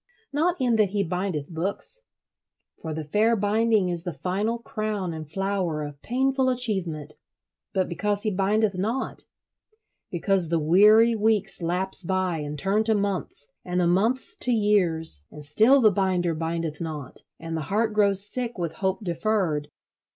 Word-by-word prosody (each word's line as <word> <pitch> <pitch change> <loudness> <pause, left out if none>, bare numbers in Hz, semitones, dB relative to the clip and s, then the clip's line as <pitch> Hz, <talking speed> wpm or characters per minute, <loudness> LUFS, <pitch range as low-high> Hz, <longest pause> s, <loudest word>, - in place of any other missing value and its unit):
Not 335 +4 0
in 245 -3 +2
that 210 -3 +3
he 200 +1 -1
bindeth 180 -4 -3
books—for 195 - -6
the 155 0 -4
fair 215 +9 +2
binding 215 -1 +1
is 175 -1 -2
the 180 - -4
final 195 +8 -2
crown 215 -6 -4
and 155 -2 -8
flower 185 -3 -2
of 145 -1 -9
painful 265 +2 0
achievement—but 185 - -3
because 205 +4 -1
he 215 - 0
bindeth 200 +2 +1
not: 225 +8 -3 0.8
because 180 -1 +3
the 170 - +1
weary 210 +9 +5
weeks 215 -3 0
lapse 180 +4 0
by 185 -2 -1
and 150 0 -5
turn 195 +8 +1
to 220 -1 +2
months, 200 -7 -3 0.2
and 180 0 -2
the 180 - +2
months 215 +9 +1
to 250 - +1
years, 180 - +2
and 150 -1 -10
still 225 - +4
the 215 -3 +5
binder 180 -3 0
bindeth 165 -1 -3
not: 150 -5 -6 0.2
and 165 0 -5
the 160 - -2
heart 215 +8 -1
grows 200 -1 +4
sick 245 +1 -4
with 170 -3 -3
hope 190 +4 -2
deferred. 175 -5 -1
190 Hz, 150 wpm, -25 LUFS, 165-215 Hz, 0.8 s, weary